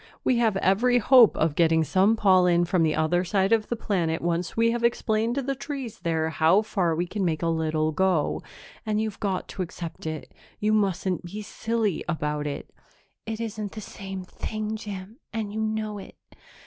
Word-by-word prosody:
"We 250 - +2
have 220 -4 +2
every 225 +7 +3
hope 245 -1 +6
of 160 -1 +2
getting 160 0 +3
some 190 +7 +3
pollen 180 -4 +4
from 180 0 +1
the 155 -1 +2
other 160 +3 +1
side 190 +2 +1
of 220 -2 +2
the 240 - -1
planet 175 -7 -1
once 175 +2 -2
we 230 0 +4
have 235 0 -2
explained 230 0 +1
to 275 - -1
the 275 +2 -1
trees 270 -3 -6
there 160 -1 -1
how 165 +7 +4
far 180 -6 0
we 175 +2 0
can 200 +3 -3
make 165 -2 0
a - - +1
little 160 -1 0
go, 175 -2 +1 0.4
and 215 -1 0
you've 215 -2 -3
got 195 -3 -2
to - - -5
accept 170 -2 -6
it; 155 -1 -6 0.3
you 215 +1 +1
mustn't 190 -4 0
be 205 +5 -6
silly 220 -3 -1
about 150 -2 -2
it." 140 - -6 0.6
"It 220 0 -3
isn't 215 -3 -4
the 215 - -6
same 195 -2 -7
thing, 215 +3 -4
Jim, 205 0 -7
and 215 -2 -4
you 220 - -3
know 215 -1 -2
it. - - -11
195 Hz, 190 wpm, -26 LUFS, 170-220 Hz, 0.6 s, hope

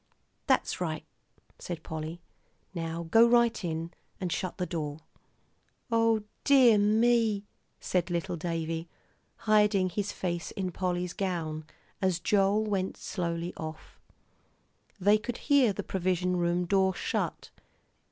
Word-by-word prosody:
"That's - - +1
right," - - -2 0.5
said 170 -3 -6
Polly; 160 +2 -5 0.5
"now 165 -1 -3
go 230 +1 +7
right 235 -2 +3
in 165 0 -3 0.3
and 180 -2 -3
shut 185 +1 -3
the 180 - -1
door." 155 -3 -4 0.9
"O 225 -1 +3 0.2
dear 255 -6 +6
me," 220 0 +3 0.3
said 180 -1 -1
little 170 0 -2
Davie, 165 0 -3 0.6
hiding 210 -3 +4
his 205 +2 -2
face 175 -2 -3
in 185 -2 -3
Polly's 180 -1 -2
gown, 165 -6 -3 0.4
as 185 -3 +2
Joel 200 +4 +2
went 195 -3 -1
slowly 170 -1 -3
off. 155 0 -8 1.0
They 205 +3 +4
could 235 +2 -4
hear 280 -6 +4
the 195 - -4
provision 180 -1 0
room 175 0 +1
door 190 0 +2
shut. - - -3
185 Hz, 125 wpm, -29 LUFS, 170-210 Hz, 1.0 s, go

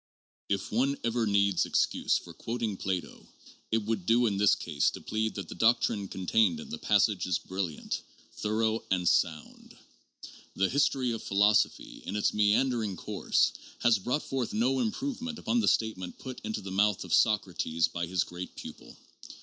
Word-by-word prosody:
IP 100 -1 -1
one 135 +5 +1
ever 115 -1 0
needs 100 -2 +3
excuse - - +1
for 85 - -10
quoting 115 +3 -3
Plato, 95 -2 -4 0.4
it 110 -1 +1
would 105 -5 -2
do 120 +2 +4
in 100 -4 +1
this 105 0 +5
case 75 -4 0
to - - -8
plead 110 0 -2
that 100 -4 -5
the - - -7
doctrine 110 0 +2
contained 110 - +1
in 225 -1 -9
the 235 - -5
passage 105 - +2
is 90 - +1
brilliant, 95 -5 -4 0.3
thorough, 110 +1 0
and 90 -2 +1
sound. 80 -3 -1 0.8
The 95 0 +2
history 135 -3 +1
of 115 - -4
philosophy, 105 +2 +1
in 95 - -3
its 105 - +1
meandering 105 0 +2
course, - - +1 0.3
has 115 -3 +5
brought 125 +9 -1
forth 130 -3 -3
no 130 +4 +2
improvement 245 - -3
upon 240 - 0
the 225 - +1
statement 100 -5 0
put 130 -1 -8
into 110 0 -3
the 95 -1 -7
mouth 100 +1 +2
of - - -4
Socrates 90 -6 +2
by 85 0 -4
his 90 0 +1
great 90 +1 -8
pupil. - - -10
105 Hz, 165 wpm, -29 LUFS, 95-120 Hz, 0.8 s, this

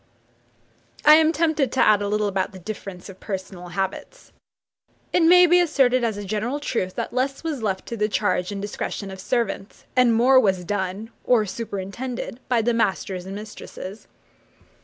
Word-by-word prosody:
I 300 - +9
am 315 0 +6
tempted 310 -5 +1
to 260 - -1
add 210 -1 +5
a 205 - -1
little 210 +1 0
about 195 0 -1
the - - -9
difference 195 -1 -7
of 190 -2 -12
personal 190 -3 -6
habits. 190 - -5 0.8
It - - +4
may 360 +2 +7
be 355 +1 +5
asserted 270 -7 +3
as 220 -3 0
a 205 - -6
general 215 +8 -2
truth, 185 -10 -2
that - - -4
less 270 +3 -1
was 310 -6 -3
left 195 -3 -2
to 235 - -4
the 210 0 +1
charge 205 -3 0
and 200 - -4
discretion 200 0 -4
of 190 - -9
servants, 205 -1 -2
and 250 -3 +4
more 255 +3 +6
was 190 -6 +1
done, 200 +3 -3
or 235 -4 +3
superintended, 230 +4 -5
by 235 -3 +2
the 240 +1 +2
masters 190 -4 -1
and 195 - -6
mistresses. 210 -1 -9
215 Hz, 175 wpm, -23 LUFS, 195-255 Hz, 0.8 s, I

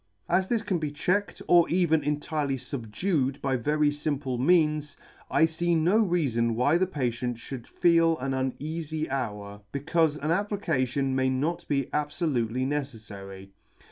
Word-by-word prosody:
As 180 +2 +2
this 230 0 0
can 190 -5 -1
be 155 -2 -2
checked, 180 +7 -1
or 175 -1 +5
even 170 -3 +2
entirely 150 -1 -1
fubdued 130 - -2
by 135 -1 0
very 150 +4 +1
fimple 145 -4 -2
means, 150 -1 +2 0.3
I 160 - +4
fee 170 +1 0
no 180 +8 +3
reafon 130 - +1
why 145 +8 +3
the 185 - +2
patient 125 -6 -2
fhould 120 0 -8
feel 165 -1 +3
an 135 -1 -3
uneafy 155 +4 -3
hour, 105 -6 -4
becaufe 150 +2 +1
an 155 - +1
application 155 - 0
may 130 0 +2
not 160 +7 -1
be 140 -1 +1
abfolutely 135 -5 -1
neceffary. 105 -9 -6
145 Hz, 140 wpm, -27 LUFS, 130-165 Hz, 0.3 s, or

